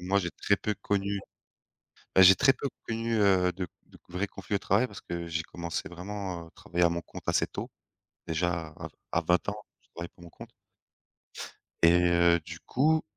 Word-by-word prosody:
moi, 95 Hz, +3 st, +2 dB
j'ai 85 Hz, -3 st, -2 dB
très 100 Hz, -, +1 dB
peu 105 Hz, -, -2 dB
connu, 100 Hz, 0 st, 0 dB, 1.0 s
ben, 95 Hz, -, +8 dB
j'ai 95 Hz, +1 st, +10 dB
très 135 Hz, +8 st, +5 dB
peu 140 Hz, -, -3 dB, 0.2 s
connu, 115 Hz, 0 st, -1 dB
heu, 95 Hz, -3 st, +4 dB
de 90 Hz, 0 st, -4 dB, 0.2 s
de -, -, -18 dB
vrai 90 Hz, +3 st, -1 dB
conflit 95 Hz, +2 st, -4 dB
au -, -, +4 dB
travail 110 Hz, +6 st, +2 dB
parce 100 Hz, -, -10 dB
que 85 Hz, 0 st, -5 dB
j'ai 80 Hz, 0 st, -2 dB
commencé 85 Hz, -1 st, -5 dB
vraiment 90 Hz, -1 st, -6 dB
à -, -, -19 dB
travailler 90 Hz, 0 st, -1 dB
à 85 Hz, -, +6 dB
mon 85 Hz, 0 st, -2 dB
compte -, -, -10 dB
assez -, -, +3 dB
tôt. -, -, -6 dB, 0.6 s
Déjà 85 Hz, 0 st, -1 dB
à -, -, -6 dB, 0.2 s
à -, -, +2 dB
20 90 Hz, 0 st, +2 dB
ans, 100 Hz, -, -4 dB, 0.3 s
je -, -, -31 dB
travaillais 85 Hz, 0 st, -6 dB
pour 85 Hz, -, -15 dB
mon 85 Hz, -, -11 dB
compte. -, -, -11 dB, 1.3 s
Et 85 Hz, -, +8 dB
heu, 85 Hz, -1 st, +4 dB
du 80 Hz, +1 st, -9 dB
coup, 155 Hz, +5 st, +2 dB
90 Hz, 195 wpm, -29 LUFS, 85-100 Hz, 1.3 s, j'ai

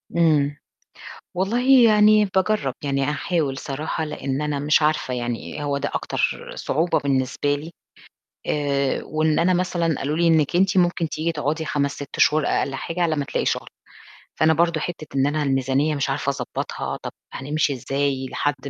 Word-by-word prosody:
إمم. 150 Hz, -4 st, +3 dB, 0.8 s
والله 245 Hz, +7 st, +4 dB
يعني 215 Hz, -1 st, +5 dB
باجرّب، 190 Hz, -7 st, 0 dB
يعني 140 Hz, -1 st, 0 dB
أحاول 150 Hz, -1 st, -1 dB
صراحة 150 Hz, +4 st, -3 dB
لإن 140 Hz, -2 st, -3 dB
أنا 150 Hz, -1 st, -1 dB
مش 150 Hz, +2 st, +3 dB
عارفة 150 Hz, -4 st, +1 dB
يعني 120 Hz, +4 st, -4 dB
هو 145 Hz, -1 st, -1 dB
ده 140 Hz, -, -2 dB
أكتر -, -, -2 dB
صعوبة 165 Hz, +4 st, 0 dB
بالنسبة 140 Hz, +1 st, 0 dB
لي 155 Hz, +4 st, -8 dB, 0.8 s
آآ 140 Hz, -2 st, 0 dB
وإن 155 Hz, 0 st, 0 dB
أنا 180 Hz, +2 st, +3 dB
مثلًا 175 Hz, -2 st, 0 dB
قالوا 150 Hz, +3 st, -2 dB
لي: 170 Hz, +1 st, +2 dB
"إنِّك 160 Hz, -1 st, +3 dB
أنتِ 190 Hz, +1 st, +3 dB
ممكن 175 Hz, -2 st, +1 dB
تيجي 160 Hz, +2 st, -2 dB
تقعدي 155 Hz, +1 st, -2 dB
5 140 Hz, -2 st, -1 dB
6 145 Hz, -1 st, -8 dB
شهور 155 Hz, -1 st, +4 dB
أقل 135 Hz, -, 0 dB
حاجة 165 Hz, +6 st, -4 dB
على 160 Hz, -2 st, +1 dB
ما 145 Hz, -, -1 dB
تلاقي -, -, -2 dB
شُغل." -, -, -1 dB, 0.7 s
فأنا 160 Hz, 0 st, +5 dB
برضه 170 Hz, 0 st, +2 dB
حتّة 160 Hz, -2 st, -5 dB
إن 135 Hz, 0 st, +3 dB
أنا 150 Hz, +1 st, 0 dB
الميزانية 135 Hz, +2 st, +1 dB
مش 140 Hz, -1 st, -1 dB
عارفة 135 Hz, +1 st, -1 dB
أضبّطها، -, -, -4 dB
طَب -, -, -5 dB, 0.2 s
هنمشي 145 Hz, +2 st, -1 dB
إزاي 135 Hz, +1 st, -1 dB
لحد 145 Hz, 0 st, 0 dB
150 Hz, 165 wpm, -23 LUFS, 140-170 Hz, 0.8 s, يعني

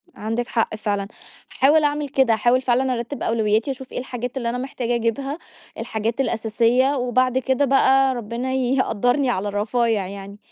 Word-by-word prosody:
عندِك 225 Hz, +3 st, -3 dB
حق 225 Hz, -2 st, -1 dB
فعلًا، 205 Hz, -2 st, -2 dB, 0.4 s
هاحاول 295 Hz, +3 st, +4 dB
أعمل 295 Hz, -1 st, 0 dB
كده. 265 Hz, -4 st, +3 dB
هاحاول 240 Hz, +3 st, +2 dB
فعلًا 255 Hz, +1 st, +1 dB
أرتّب 240 Hz, +4 st, -5 dB
أولوياتي 220 Hz, +3 st, +1 dB
واشوف 265 Hz, 0 st, -9 dB
إيه -, -, -4 dB
الحاجات 250 Hz, 0 st, -5 dB
اللي 235 Hz, -2 st, -1 dB
أنا 245 Hz, -, -2 dB
محتاجة 250 Hz, -2 st, -3 dB
أجيبها، 270 Hz, +6 st, -2 dB, 0.4 s
الحاجات 225 Hz, +4 st, -2 dB
الأساسية 235 Hz, +3 st, +1 dB
وبعد 255 Hz, 0 st, +1 dB
كده 265 Hz, +2 st, +1 dB
بقى 270 Hz, 0 st, +4 dB
ربنا 240 Hz, +3 st, -4 dB
يقدّرني 255 Hz, 0 st, +1 dB
على 205 Hz, -2 st, -1 dB
الرفايع 210 Hz, 0 st, 0 dB
يعني. 200 Hz, +1 st, -9 dB
245 Hz, 155 wpm, -22 LUFS, 225-265 Hz, 0.4 s, هاحاول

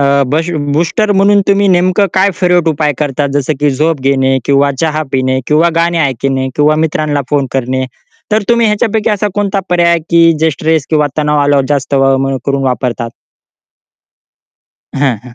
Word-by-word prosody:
अ, -, -, +2 dB, 0.3 s
बसीव 165 Hz, +2 st, -1 dB, 0.2 s
booster 175 Hz, +8 st, 0 dB
म्हणून 200 Hz, +1 st, +3 dB
तुम्ही 200 Hz, 0 st, +3 dB
नेमकं 185 Hz, +2 st, +2 dB
काय 190 Hz, +1 st, +3 dB
फिरवट 180 Hz, -2 st, +2 dB
उपाय 150 Hz, -1 st, 0 dB
करतात 145 Hz, -1 st, -1 dB
जसं 145 Hz, +1 st, 0 dB
की 145 Hz, -, +2 dB
झोप 155 Hz, +2 st, -1 dB
घेणे 135 Hz, 0 st, +1 dB
किंवा 140 Hz, 0 st, +2 dB
चहा 155 Hz, -1 st, 0 dB
पिणे 130 Hz, 0 st, 0 dB
किंवा 155 Hz, +3 st, +3 dB
गाणी 170 Hz, +1 st, +1 dB
ऐकणे 135 Hz, -2 st, -1 dB
किंवा 150 Hz, +1 st, +3 dB
मित्रांना 150 Hz, -2 st, -1 dB
फोन 140 Hz, -2 st, +1 dB
करणे 130 Hz, 0 st, -1 dB, 0.5 s
तर 215 Hz, 0 st, +2 dB
तुम्ही 235 Hz, -1 st, +3 dB
ह्याच्यापैकी 215 Hz, +1 st, 0 dB
असा 210 Hz, 0 st, -1 dB
कोणता 200 Hz, -1 st, -1 dB
पर्याय 175 Hz, -1 st, +3 dB
आहे 170 Hz, -, +2 dB
की 165 Hz, 0 st, +5 dB
जे 160 Hz, 0 st, +2 dB
स्ट्रेस 155 Hz, 0 st, -1 dB
किंवा 150 Hz, -2 st, +2 dB
तणाव 150 Hz, 0 st, +1 dB
आल्यावर 145 Hz, -1 st, +2 dB
जास्त 140 Hz, -1 st, -1 dB
वळ-मळ 135 Hz, 0 st, +1 dB
करून 140 Hz, -1 st, -1 dB
वापरतात? 125 Hz, -2 st, -2 dB, 1.8 s
हां, 135 Hz, -5 st, 0 dB
हां. 125 Hz, -1 st, -13 dB
150 Hz, 170 wpm, -12 LUFS, 135-175 Hz, 1.8 s, की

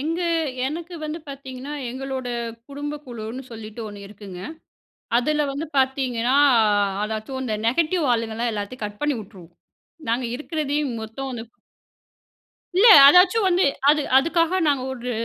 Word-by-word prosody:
எங்க 330 Hz, +5 st, -2 dB, 0.5 s
எனக்கு 335 Hz, +4 st, -5 dB
வந்து 305 Hz, +2 st, -4 dB
பாத்தீங்கன்னா 270 Hz, 0 st, -8 dB, 0.2 s
எங்களோட 260 Hz, -1 st, -5 dB, 0.4 s
குடும்ப 290 Hz, +1 st, -5 dB
குழுன்னு 235 Hz, +2 st, -7 dB
சொல்லிட்டு 220 Hz, 0 st, -9 dB
ஒண்ணு 200 Hz, -1 st, -10 dB
இருக்குங்க. 195 Hz, -3 st, -10 dB, 0.8 s
அதுல 300 Hz, +4 st, +1 dB
வந்து 295 Hz, +3 st, -5 dB
பாத்தீங்கன்னா 260 Hz, -2 st, +1 dB, 0.7 s
அதாச்சும் 220 Hz, +5 st, -4 dB
அந்த 220 Hz, -4 st, -2 dB
நெகட்டிவ் 325 Hz, +5 st, +1 dB
ஆளுங்கல்லாம் 230 Hz, +1 st, -2 dB
எல்லாத்தையும் 210 Hz, +3 st, -5 dB
கட் 205 Hz, 0 st, -9 dB
பண்ணி 295 Hz, -2 st, +1 dB
உட்டுருவோம். 180 Hz, -4 st, -15 dB, 0.5 s
நாங்க 245 Hz, +2 st, 0 dB
இருக்கிறதையும் 295 Hz, -2 st, -2 dB
மொத்தம் 260 Hz, +5 st, -6 dB
அந்த 230 Hz, -, -5 dB, 1.4 s
இல்ல, 445 Hz, +5 st, +7 dB, 0.2 s
அதாச்சும் 365 Hz, +7 st, +6 dB
வந்து 360 Hz, +1 st, +3 dB, 0.2 s
அது 300 Hz, 0 st, +5 dB, 0.2 s
அதுக்காக 335 Hz, +4 st, +1 dB
நாங்க 280 Hz, -3 st, +2 dB
ஒரு 250 Hz, -1 st, -5 dB
265 Hz, 125 wpm, -23 LUFS, 230-300 Hz, 1.4 s, இல்ல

